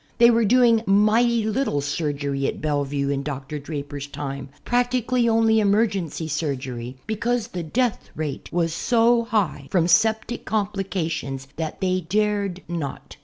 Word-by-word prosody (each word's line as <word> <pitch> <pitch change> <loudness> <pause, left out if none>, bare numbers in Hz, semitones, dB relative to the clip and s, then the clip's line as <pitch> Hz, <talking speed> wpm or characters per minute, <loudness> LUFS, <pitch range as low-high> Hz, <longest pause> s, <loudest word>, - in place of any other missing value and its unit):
They 235 0 +7
were 230 -1 +3
doing 235 0 +5
mighty 215 +3 +3
little 220 - 0
surgery 140 -1 -2
at - - -3
Bellevue 145 -2 -1
in 140 -1 0
Dr. 140 +1 -5
Draper's 145 -1 -6
time, 140 -1 -6 0.2
practically 245 0 +1
only 225 0 +4
emergency 200 -6 +1
surgery, 130 -5 -3
because 230 +1 -1
the 180 - -4
death 230 +7 -1
rate 150 -3 -5
was 165 -2 0
so 235 +3 +3
high 195 - -1
from 170 -3 +2
septic 220 +5 +2
complications 180 -10 -2
that 160 +3 -4
they 185 -1 +1
dared 200 0 -1
not. 165 -5 -5
185 Hz, 135 wpm, -23 LUFS, 145-225 Hz, 0.2 s, They